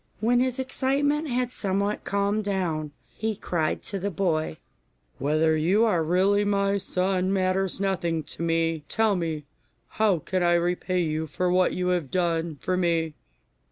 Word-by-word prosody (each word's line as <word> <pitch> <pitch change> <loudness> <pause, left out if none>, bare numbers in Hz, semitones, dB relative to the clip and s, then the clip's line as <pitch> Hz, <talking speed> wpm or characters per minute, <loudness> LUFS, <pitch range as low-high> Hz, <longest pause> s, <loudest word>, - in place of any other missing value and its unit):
When 240 +3 +3
his 255 0 +1
excitement 280 +3 0
had 250 -1 -1
somewhat 200 +1 -1
calmed 200 +2 0
down, 170 -7 -2 0.2
he 220 0 -2
cried 165 -5 -2
to 200 - -2
the 200 +2 -2
boy, 160 - -1 0.6
'Whether 155 +2 +2
you 185 +9 +3
are 175 -7 +2
really 190 +5 +3
my 200 0 +1
son 185 0 0
matters 190 0 0
nothing 175 -5 -1
to 150 - -8
me; 165 -1 0
tell 220 -2 +2
me, 160 -4 -3 0.4
how 215 -4 +2
can 185 +4 -2
I 175 0 +3
repay 180 +1 0
you 160 -1 -1
for 180 +4 -1
what 185 0 +3
you 180 0 -1
have 175 -6 0
done 170 -2 0
for 185 +8 -1
me? 165 -3 +1
185 Hz, 155 wpm, -26 LUFS, 165-200 Hz, 0.6 s, When